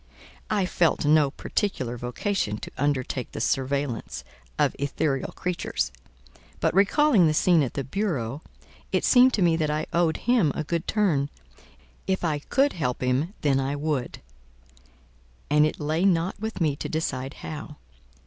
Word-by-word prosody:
I 205 -3 +1
felt 170 -4 +1
no 150 -1 +5
particular 135 - -2
vocation 120 - -2
to - - -8
undertake 130 -3 -1
the - - -5
surveillance 135 -2 -1 0.3
of - - +2
ethereal 140 -1 -1
creatures; 175 - -2 0.7
but - - +1
recalling 205 - +4
the 155 - +1
scene 170 0 +4
at 130 - -2
the 140 - -1
bureau, 140 - -2 0.5
it - - +1
seemed 255 0 +6
to 195 - +1
me 170 -2 +4
that 155 -2 0
I 150 +1 -1
owed 170 -2 +2
him 225 - +3
a 155 - -2
good 170 +2 -3
turn: 165 -10 +1 0.8
if 190 -1 0
I 150 -3 0
could 275 - +1
help 130 -7 -2
him 135 - 0
then 140 -2 +2
I 135 +1 -1
would, 145 -4 -3 1.3
and 150 +1 +5
it - - -5
lay 155 +3 0
not 180 -2 +1
with 220 0 -4
me 155 -5 +1
to - - -5
decide 135 -4 -3
how. 150 0 -7
155 Hz, 155 wpm, -25 LUFS, 140-180 Hz, 1.3 s, seemed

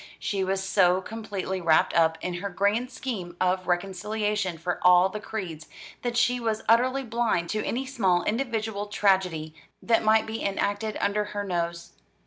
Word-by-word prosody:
She 195 -2 -2
was 190 +1 -1
so 180 -1 +3
completely 195 -3 -5
wrapped 160 -2 +3
up 160 -1 +3
in 180 - -3
her 200 - -3
grand 205 +6 0
scheme 215 -10 -5
of 185 0 0
reconciliation 195 +1 -1
for 175 +2 -3
all 180 +1 +6
the 210 - -5
creeds, 180 -8 -6 0.3
that 240 -1 -2
she 245 +1 +3
was 225 -2 -2
utterly 255 +4 +3
blind 230 -8 0
to 215 0 -1
any 260 +3 -2
small 195 -10 +1
individual 220 -3 -2
tragedy 185 -6 +1 0.3
that 230 -1 +2
might 220 0 +4
be 220 +1 -5
enacted 205 +2 -1
under 210 +1 0
her 205 0 -4
nose. 170 -2 -3
200 Hz, 160 wpm, -26 LUFS, 180-220 Hz, 0.3 s, all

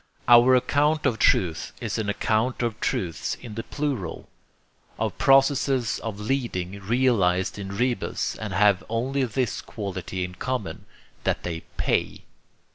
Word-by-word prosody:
Our 120 +2 +7
account 150 +4 +2
of 110 - +1
truth 85 -4 +2
is 115 -2 -3
an 105 -2 -2
account 110 +4 0
of 115 -2 -2
truths 85 -4 -2
in 120 -4 -10
the 115 - -3
plural, 135 - -4 0.7
of - - -2
processes 135 -2 +3
of 110 -3 -5
leading, 105 -6 -2
realized 100 -5 +1
in 100 0 -6
rebus, 120 -3 -1
and 110 -2 -5
having 100 0 +3
only 130 +4 0
this 120 0 -2
quality 95 -3 -5
in 90 0 -5
common, 105 -4 -4 0.4
that - - 0
they 85 -2 -3 0.2
PAY. - - 0
110 Hz, 135 wpm, -25 LUFS, 95-130 Hz, 0.7 s, Our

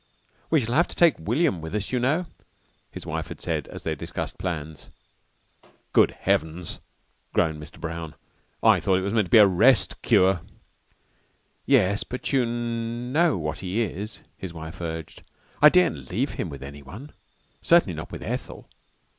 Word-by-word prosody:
"We 160 -3 +4
shall 120 0 -3
have 170 +5 +4
to - - -11
take 170 -4 +4
William 120 - +1
with 80 +5 -6
us, 105 -1 -2
you 125 - +1
know," 150 +9 +1 0.6
his - - -9
wife 80 +1 -3
had 85 -3 -9
said 80 -4 -2
as - - -9
they - - -1
discussed - - -5
plans. 80 -4 -5 1.0
"Good - - +6
heavens!" 80 +2 -1 0.5
groaned 80 -2 +1
Mr. 75 - -10
Brown. 80 -2 -5 0.5
"I - - +6
thought 95 - +2
it 95 - +1
was 100 +2 -2
to 110 -2 +3
be 105 - +5
a 105 - +9
rest 100 +1 +3
cure." 95 -2 +3 1.3
"Yes, 100 -7 +3
but 125 +3 -5
you 130 -3 +3
know 120 - 0
what 75 -2 -3
he 95 +5 -1
is," 105 +1 -5
his 95 -3 -7
wife 80 +1 -8
urged. 80 -2 -6 0.4
"I 150 - +10
daren't 80 - +2
leave - - -1
him - - -4
with 70 -1 -8
anyone. 70 - -10 0.5
Certainly - - +4
not - - -7
with - - -7
Ethel. - - -5
95 Hz, 165 wpm, -25 LUFS, 80-120 Hz, 1.3 s, I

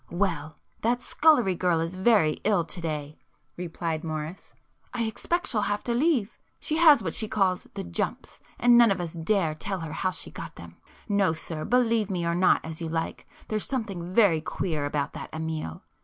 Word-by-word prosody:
"Well 165 -5 -2 0.2
that 240 +2 +1
scullery 290 -12 +4
girl 175 -1 +1
is 165 +2 -2
very 190 -6 +3
ill 200 -5 +3
to 175 - -7
day,"—replied 160 +2 -5
Morris; 155 +2 -6 0.4
"I 235 - 0
expect 340 +10 -1
she'll 215 - 0
have 205 0 -1
to 240 - -1
leave. 255 -5 +1 0.2
She 310 - -1
has 310 -8 +7
what 165 - -2
she 220 - +1
calls 190 -4 0
the - - -4
'jumps' 85 -1 -3 0.2
and 240 0 +6
none 235 -1 +7
of 195 -2 0
us 170 -2 -4
dare 170 -1 +1
tell 190 +4 -4
her 160 -1 -5
how 185 - 0
she - - -4
got - - -8
them. - - -12 0.3
No 200 -5 +2
sir, 160 -1 -5
believe 230 -4 +2
me 180 -3 -1
or 170 - +1
not 180 +2 +3
as 160 +1 -7
you 165 - -3
like, 160 0 -3 0.2
there's 215 -1 +1
something 195 -9 -3
very 185 -6 +4
queer 155 -2 -2
about 145 -1 -2
that - - -7
Amiel. 160 - -4
185 Hz, 185 wpm, -27 LUFS, 160-220 Hz, 0.4 s, has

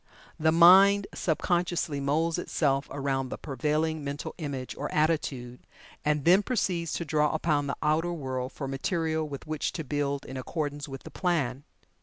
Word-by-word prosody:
The 160 0 +3
mind 190 +4 +7
sub 160 -3 0
consciously 170 -4 0
moulds 160 +5 0
itself 140 -5 0
around 135 -2 -2
the - - -5
prevailing 155 +2 -1
mental 140 +1 -5
image 140 -5 -4
or 145 - -4
attitude, 140 -6 0 0.4
and 150 -2 0
then 180 +4 +6
proceeds 180 -8 -1
to 170 - -2
draw 150 0 +2
upon 150 -3 +1
the 140 - -3
outer 155 +3 +1
world 130 -5 -4
for 140 - -5
material 160 +3 -1
with 140 -2 -7
which 155 -1 -2
to 160 - -4
build 140 0 -2
in 130 - -7
accordance 145 +1 -4
with 135 -1 -8
the - - -10
plan. 145 -7 -1
150 Hz, 165 wpm, -28 LUFS, 140-165 Hz, 0.4 s, mind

